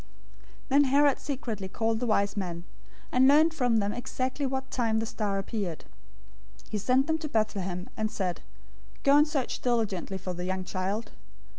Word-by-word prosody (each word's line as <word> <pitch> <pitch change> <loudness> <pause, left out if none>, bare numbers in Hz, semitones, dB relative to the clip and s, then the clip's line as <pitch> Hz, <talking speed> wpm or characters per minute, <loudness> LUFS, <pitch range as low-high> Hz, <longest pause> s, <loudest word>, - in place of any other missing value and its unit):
'"{Micah 275 - +3
5:2} - - +7
002:007 - - +8
Then - - +6
Herod 280 +1 +4
secretly 235 -8 -4
called 225 +3 -1
the 245 - -1
wise 200 -2 +2
men, 175 -4 -3 0.5
and 255 +1 +5
learned 310 +4 +6
from 250 -7 +2
them 205 -1 +1
exactly 260 +3 -2
what 265 0 -3
time 230 -3 +1
the 225 - 0
star 210 -3 -2
appeared. 195 -5 -4 0.8
002:008 - - -23
He 215 - 0
sent 255 +6 +3
them 320 +1 0
to 310 -2 -5
Bethlehem, 195 -6 -1
and 215 -1 -1
said, 185 -4 -2 0.6
"Go 280 0 +6
and 295 +1 +6
search 280 -4 -2
diligently 210 -6 0
for 185 -1 -5
the 180 0 -5
young 185 0 -2
child. 190 +4 -3
225 Hz, 185 wpm, -28 LUFS, 195-265 Hz, 0.8 s, 002:007